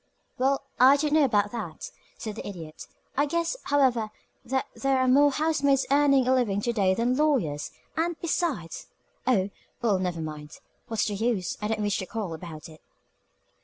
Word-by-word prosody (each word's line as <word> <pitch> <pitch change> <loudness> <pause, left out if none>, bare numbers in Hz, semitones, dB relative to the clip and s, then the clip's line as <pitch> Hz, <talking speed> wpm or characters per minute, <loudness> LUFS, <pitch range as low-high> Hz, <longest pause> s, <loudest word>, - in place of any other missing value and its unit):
"Well, 270 +2 +2 0.2
I 265 +3 +7
don't 295 +1 0
know 310 -1 +5
about 205 -5 +2
that," 215 -9 -6 0.3
said 215 - -5
the 220 - -7
Idiot. 165 -6 -8 0.3
"I 285 +2 +2
guess, 335 +7 -1
however, 255 -6 +2 0.3
that 265 +2 -1
there 270 -1 +1
are 260 0 +2
more 285 +3 +6
housemaids 285 -2 +2
earning 275 -2 +4
a 260 - +4
living 225 -6 +1
to 235 +2 -1
day 190 -4 +2
than 240 +3 +1
lawyers 245 - +1 0.3
and, 330 +1 -1
besides 315 - -2 0.4
oh, 200 -6 +2 0.3
well, 205 -5 +2
never 180 -2 -2
mind 150 -1 -7 0.3
What's 225 -2 0
the 210 - -2
use? 205 -3 -1
I 210 - -1
don't 215 0 -1
wish 205 -1 0
to 185 - -5
quarrel 205 -5 -4
about 160 -1 -8
it." 160 -1 -15
235 Hz, 175 wpm, -27 LUFS, 195-275 Hz, 0.4 s, I